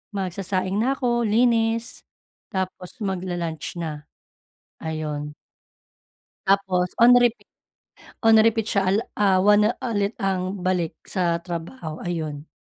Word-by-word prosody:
magsasaing 190 0 -2
na 255 +5 +2
ako 240 -3 +1
linis, 230 +1 +1 0.5
tapos 185 +3 -4
mag-la-lunch 175 -5 -3
na, 150 -3 -5 0.8
ayon. 150 -2 -4 1.2
Tapos 190 -2 +2
on 240 +1 +7
repeat, 240 -1 +2 0.8
on 225 0 +7
repeat 225 -1 +2
siya 200 - +2
ala 200 +4 +2 0.2
ah, 195 -2 +4
1 210 +1 +5
na - - +2 0.2
ulit 205 0 -1
ang 190 -1 -1
balik 180 -3 0
sa 175 -3 0
trabaho, 170 -1 -6
ayon. 155 -4 -4
190 Hz, 115 wpm, -24 LUFS, 170-220 Hz, 1.2 s, on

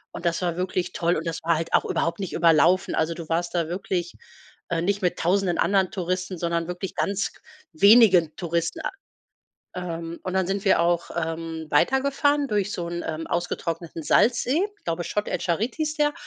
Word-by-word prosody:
und - - -7
das 170 - 0
war 175 -1 -1
wirklich 185 -1 -2
toll, 170 +1 +1
und 160 - -3
das 165 -1 -3
war 165 0 +2
halt 165 +1 -4
auch - - +4
überhaupt 170 +2 -1
nicht 190 -3 -4
überlaufen. 170 +2 +4
Also, 160 +1 0
du 165 -2 -8
warst 175 +2 -1
da 165 -2 +1
wirklich, 175 -1 -3 0.6
äh, 165 - 0
nicht 200 +3 0
mit 180 -2 0
Tausenden 180 0 +1
anderen 195 -2 +2
Touristen, 185 0 -3
sondern 170 0 -1
wirklich 180 +1 -5
ganz 200 0 -1 0.4
wenige 190 -3 +6
Touristen 170 - -2 0.9
Ähm, 170 -2 -5
und 185 -1 -4
dann 190 -2 +1
sind 195 +2 -2
wir 190 - +4
auch, 170 0 +1
ähm, 165 -1 -4
weitergefahren 280 - +2
durch 205 -3 0
so 170 -3 -4
'n, 175 0 -4
ähm, 160 0 -4
ausgetrockneten 170 -1 -3
Salzsee- 245 - +3 0.3
glaube, 170 +1 -2
Chott 210 +4 -2
el - - -1
Djerid 195 +8 -1
hieß 310 -1 -2
der. 295 0 +2
175 Hz, 180 wpm, -25 LUFS, 165-195 Hz, 0.9 s, wenige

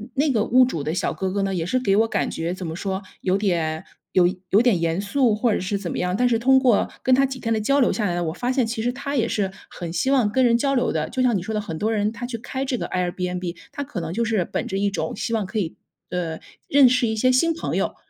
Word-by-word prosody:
那 280 +1 +2
个 215 -4 +2
屋 255 +1 +5
主 165 - -3
的 155 - -2
小 - - -1
哥 190 - -2
哥 200 0 -1
呢， 195 - -1
也 175 -3 -1
是 180 +10 0
给 200 -6 +2
我 225 +1 +4
感 - - -1
觉 165 +2 -3
怎 185 0 -6
么 160 -1 -4
说 190 +1 -3 0.2
有 190 +1 +1
点 165 -6 -1 0.3
有 180 -1 +5 0.2
有 205 +4 +5
点 240 -8 +3
严 165 +2 0
肃 220 +2 +2
或 230 +2 +1
者 - - 0
是 190 +2 -2
怎 195 -4 -5
么 - - -4
样， 180 0 0
但 250 +4 +3
是 230 -2 +2
通 265 +2 +5
过 245 -6 +3
跟 260 - +3
他 270 +2 +5
几 265 -1 -5
天 230 -2 -1
的 220 - +1
交 275 +6 +2
流 255 - +4
下 215 - -1
来 175 - 0
呢， 175 - -1
我 160 - -2
发 245 +6 -2
现 260 -2 +2
其 225 0 -3
实 245 - 0
他 280 +2 -4
也 230 -4 +2
是 200 -4 -1 0.2
很 170 -2 -6
希 260 +11 0
望 240 -7 +3
跟 260 +2 +2
人 235 0 +4
交 275 +2 +1
流 250 -1 +1
的， - - -2
就 260 - -2
像 245 -4 +3
你 - - -3
说 220 +5 -5
的 215 - 0
很 165 -6 -6
多 215 +6 0
人， 210 -1 +1
他 240 +1 -6
去 240 -1 -4
开 265 +4 -4
这 260 -2 -1
个 - - -4
Airbnb， 180 -1 -2 0.2
他 285 - -4
可 270 -10 -6
能 165 0 -4
就 230 +4 0
是 215 -6 +1
本 - - -3
着 195 - -2
一 200 +1 +1
种 200 - -3
希 230 +3 -3
望 215 -3 0
可 215 +3 -3
以， 170 -4 -3 0.3
呃 170 -3 -3 0.3
认 275 -2 +6
识 250 -1 +2
一 220 - -1
些 255 +4 +3
新 330 +6 +3
朋 330 - -4
友， - - -1
215 Hz, 335 characters per minute, -23 LUFS, 185-250 Hz, 0.3 s, 认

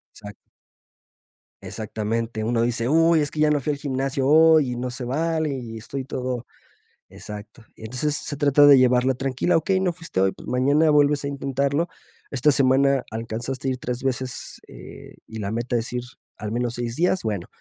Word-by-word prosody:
Exacto. 105 -1 -10 1.3
Exactamente, 110 +3 -3
uno 115 +1 0
dice: 120 0 0
"Uy, 165 +1 +4
es 145 - -2
que 155 - -7
ya 155 0 +4
no 150 -1 +2
fui 150 - -1
al 140 - -7
gimnasio 135 -1 -1
hoy, 155 -2 +5
y - - -3
no 125 +1 -3
se 125 0 -6
vale, 160 +3 -1
y 115 -3 -7
estoy 125 +5 -6
todo" 125 -2 -4 0.6
exacto. 105 +2 -10
Y - - -16
entonces 130 +6 -1
se 145 - -4
trata 145 0 +5
de 145 -1 +9
llevarla 125 +1 +3
tranquila, 135 +6 0
okey, 185 +4 +1
no 185 -2 +1
fuiste 165 - -4
hoy, 95 0 +3
pues - - -14
mañana 145 +5 +3
vuelves 145 -1 +3
a - - -1
intentarlo. 140 +3 -1 0.4
Esta 140 +2 +3
semana 135 0 +3
alcanzaste 115 +4 -4
ir 130 -1 -1
3 125 -1 -4
veces, 130 -1 -4
eh, - - -12
y 110 - -9
la 100 -2 -3
meta 120 +2 -1
es 115 +1 -3
ir 125 0 -2 0.3
al 105 0 -5
menos 120 0 -1
6 120 -1 -4
días, 180 +2 +1
bueno, 105 -5 -3
130 Hz, 185 wpm, -23 LUFS, 115-145 Hz, 1.3 s, de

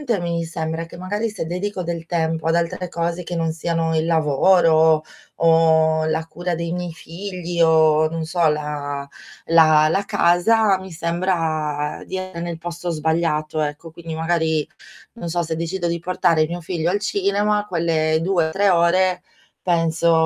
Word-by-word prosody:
praticamente 240 -8 -1
mi 170 -1 -2
sembra 160 0 -4
che 165 - -12
magari 205 +5 -2
se 210 -5 -5
dedico 185 +3 -3
del 170 -1 -5
tempo 160 -2 -1
ad 165 - +2
altre 170 +2 -1
cose, 170 +1 -2
che 175 - -5
non 165 -1 0
siano 165 0 -1
il 160 +1 0
lavoro 160 0 +4 0.4
o 160 -1 +4
la 160 0 -1
cura 175 +2 -4
dei 170 0 -3
miei 175 -1 -4
figli 175 +1 -6
o, 155 -1 +4
non 165 0 -4
so, 170 0 +1
la 145 -2 -3 0.4
la 155 -2 +5
la 195 +5 0
casa, 200 +2 +3
mi 190 0 -10
sembra 160 -4 -2
di 190 - -5
essere 185 -2 -6
nel 170 -1 -4
posto 175 +1 -6
sbagliato 155 -1 -1
ecco, 150 +2 -4
quindi 165 0 -8
magari, 160 -2 0 0.5
non 205 -8 -6
so, 175 +1 -1
se 160 0 -3
decido 170 +2 -3
di 170 0 -1
portare 165 -2 +1
mio 175 +2 -5
figlio 170 -1 -2
al 200 +2 0
cinema, 205 +1 0
quelle 160 -3 +1
2 175 -2 +1
o - - -5
3 200 0 +3
ore 180 +1 +2 0.4
penso: 165 -1 +2
170 Hz, 165 wpm, -21 LUFS, 160-180 Hz, 0.5 s, la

